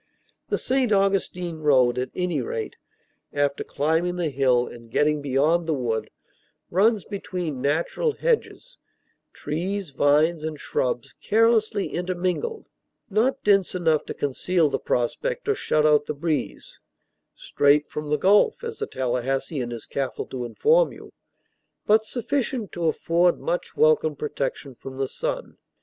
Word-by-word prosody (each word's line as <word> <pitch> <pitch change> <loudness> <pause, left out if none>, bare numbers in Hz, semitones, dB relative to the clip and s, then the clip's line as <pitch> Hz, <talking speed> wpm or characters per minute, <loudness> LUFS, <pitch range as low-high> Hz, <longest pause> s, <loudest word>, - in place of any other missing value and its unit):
The - - +1
St. 260 -3 0
Augustine 195 -4 0
road, 130 -5 +3
at 130 - -2
any 180 -6 -1
rate, 115 -2 -4 0.6
after 145 -1 0
climbing 160 +5 0
the 170 -4 -1
hill 130 -2 +2
and 115 -1 -12
getting 150 +5 +1
beyond 150 +5 +1
the 160 - +1
wood, 115 -4 -2 0.6
runs 205 +3 +3
between 180 -8 -4
natural 160 - 0
hedges, - - -2 0.5
trees, 185 +2 -4
vines, 150 +4 +2
and 155 -2 -4
shrubs 125 +2 -2
carelessly 220 -2 +2
intermingled, 185 - -2 0.5
not 240 +7 +1
dense 195 -3 +3
enough 160 -4 +2
to - - -6
conceal 155 +3 0
the - - -1
prospect 475 - -2
or 425 - +3
shut 155 - +1
out 150 -1 +4
the 150 - -3
breeze 155 +1 -3 0.6
("straight 145 +1 +2
from 150 0 -6
the 150 - +2
Gulf," 205 - +3
as 455 -1 -6
the 435 - -2
Tallahassean 130 +1 -2
is 115 -2 -7
careful 135 -2 -3
to 125 -2 -4
inform 470 - +3
you), - - -13 0.7
but 215 +1 +4
sufficient 245 -2 -2
to 170 -2 -2
afford 170 +2 +2
much 175 - -3
welcome 155 0 +3
protection 140 -1 -4
from 130 +2 -10
the 135 0 -1
sun. - - -4
160 Hz, 140 wpm, -24 LUFS, 140-200 Hz, 0.7 s, out